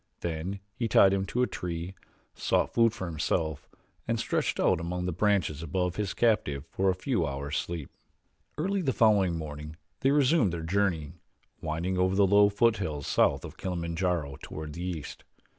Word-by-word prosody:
Then 85 Hz, +4 st, -3 dB
he 115 Hz, 0 st, -2 dB
tied 100 Hz, -2 st, +6 dB
him 95 Hz, 0 st, 0 dB
to 125 Hz, +5 st, +1 dB
a -, -, +4 dB
tree, 90 Hz, -2 st, -5 dB, 0.4 s
sought -, -, 0 dB
food 115 Hz, -1 st, +4 dB
for 110 Hz, -4 st, -6 dB
himself, 80 Hz, -2 st, -2 dB, 0.4 s
and 115 Hz, -1 st, 0 dB
stretched 115 Hz, -, -1 dB
out -, -, +3 dB
among 90 Hz, +1 st, -3 dB
the 90 Hz, -, -1 dB
branches 90 Hz, -5 st, +1 dB
above 90 Hz, +2 st, -1 dB
his 105 Hz, -3 st, -2 dB
captive 80 Hz, -, +1 dB
for 95 Hz, 0 st, +1 dB
a 95 Hz, -, +2 dB
few 105 Hz, -1 st, 0 dB
hours' 70 Hz, 0 st, -3 dB
sleep. 85 Hz, -5 st, -4 dB, 0.7 s
Early 195 Hz, +5 st, 0 dB
the 135 Hz, -6 st, 0 dB
following 100 Hz, -7 st, +3 dB
morning 75 Hz, 0 st, -7 dB, 0.2 s
they 135 Hz, -, +2 dB
resumed 140 Hz, -, +3 dB
their 85 Hz, -1 st, -4 dB
journey, 85 Hz, -4 st, 0 dB, 0.5 s
winding 85 Hz, +4 st, -2 dB
over 95 Hz, +1 st, +2 dB
the 100 Hz, 0 st, +5 dB
low 100 Hz, +1 st, +6 dB
foothills 100 Hz, -, +1 dB
south -, -, +2 dB
of -, -, -10 dB
Kilimanjaro, 85 Hz, -4 st, -2 dB
toward 75 Hz, -1 st, -7 dB
the 85 Hz, -, -7 dB
east. 85 Hz, -5 st, -5 dB
90 Hz, 170 wpm, -29 LUFS, 80-105 Hz, 0.7 s, tied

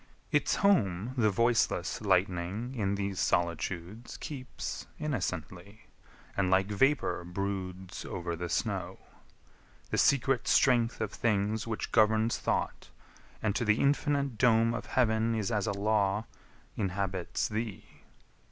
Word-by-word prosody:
Its -, -, +2 dB
home 110 Hz, -, +2 dB
The 110 Hz, -4 st, +3 dB
voiceless 115 Hz, +3 st, +1 dB
lightning 95 Hz, +4 st, 0 dB
in 100 Hz, -5 st, 0 dB
these 100 Hz, -2 st, -3 dB
solitudes 85 Hz, +6 st, -2 dB
Keeps 130 Hz, -4 st, -6 dB
innocently, 100 Hz, -, -4 dB, 0.5 s
and 95 Hz, -2 st, +1 dB
like 95 Hz, +1 st, +3 dB
vapour 135 Hz, -3 st, +2 dB
broods 95 Hz, 0 st, -4 dB
Over 85 Hz, -2 st, -4 dB
the 85 Hz, +1 st, -5 dB
snow. -, -, -2 dB, 0.9 s
The -, -, +1 dB
secret 135 Hz, -1 st, +3 dB
Strength 120 Hz, -4 st, +3 dB
of 110 Hz, -2 st, -1 dB
things 105 Hz, 0 st, 0 dB
Which 110 Hz, -1 st, -3 dB
governs 110 Hz, +1 st, +3 dB
thought, -, -, -2 dB, 0.5 s
and 105 Hz, -2 st, +1 dB
to -, -, 0 dB
the 105 Hz, -1 st, +3 dB
infinite 140 Hz, -3 st, +1 dB
dome 115 Hz, -1 st, +4 dB
Of -, -, -5 dB
Heaven 115 Hz, -2 st, +2 dB
is 110 Hz, -2 st, -1 dB
as 105 Hz, -1 st, 0 dB
a -, -, +1 dB
law, 100 Hz, +1 st, +1 dB, 0.5 s
inhabits 95 Hz, -2 st, -2 dB
thee! 110 Hz, -2 st, -5 dB
105 Hz, 125 wpm, -30 LUFS, 95-115 Hz, 0.9 s, dome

